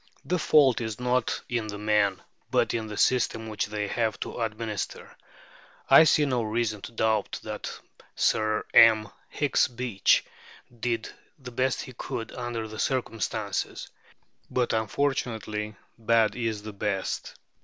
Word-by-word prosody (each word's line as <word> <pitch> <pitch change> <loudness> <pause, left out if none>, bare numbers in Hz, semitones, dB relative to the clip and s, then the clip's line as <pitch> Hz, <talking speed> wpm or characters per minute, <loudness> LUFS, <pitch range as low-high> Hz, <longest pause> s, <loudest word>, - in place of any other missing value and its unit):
The 180 0 0
fault 140 -6 +4
is 110 -1 -4
not 125 0 0
in 120 -3 -2
the 105 -1 -5
men, 105 -2 +1 0.3
but - - +2
in 110 -2 -2
the 105 -1 -7
system 115 -3 +2
which 110 -1 -2
they 105 0 -3
have 110 0 -1
to - - -5
administer. 110 -2 -4 0.8
I 160 - +10
see 150 -1 +4
no 125 -4 0
reason 110 -1 -1
to - - -8
doubt 110 -2 0
that - - -5 0.4
Sir 110 0 +1
M. 110 -2 +7 0.2
Hicks 145 -2 +2
Beach 120 -5 +1 0.5
did 115 -1 -1 0.3
the 130 -3 -10
best 130 +2 0
he 130 - -10
could 115 -1 -5
under 120 -3 -4
the 110 0 -9
circumstances; 115 -5 -2 0.6
but, 125 -1 0
unfortunately, 110 -3 -1 0.2
bad 115 -1 +3
is 115 -4 -2
the 110 -1 -7
best. 100 -1 -3
115 Hz, 140 wpm, -27 LUFS, 105-125 Hz, 0.8 s, I